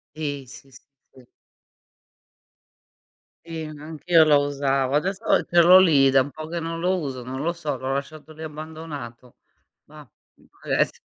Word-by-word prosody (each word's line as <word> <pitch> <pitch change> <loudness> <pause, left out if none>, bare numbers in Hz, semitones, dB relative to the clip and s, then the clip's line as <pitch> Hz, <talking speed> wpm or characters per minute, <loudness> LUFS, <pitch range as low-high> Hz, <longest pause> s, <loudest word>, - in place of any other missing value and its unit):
Sì, 145 -3 -4
si, 135 +2 -14
si, 130 - -17 0.3
si. 125 -2 -19 2.2
Sì, 165 -1 -6
anch'io 155 +2 +1
lo 150 -2 +4
usavo. 140 -1 -1
Adesso 190 +7 -1 0.2
ce 175 0 +3
l'ho 180 +2 +8
lì, 150 -7 +5
è - - +3
da 135 - +5
un 140 - -8
po' 155 +2 -9
che 170 0 -4
non 165 0 -5
lo 185 +2 +1
uso, 135 -5 -5
non 130 +2 -6
lo 170 +3 -1
so, 155 -5 -4
l'ho 130 +1 -3
lasciato 150 +3 -6
lì 155 +1 -12
abbandonato. 150 -6 -9 0.5
Mah, 150 -2 -15 0.3
può - - -26 0.3
esse - - +1
150 Hz, 160 wpm, -23 LUFS, 135-165 Hz, 2.2 s, l'ho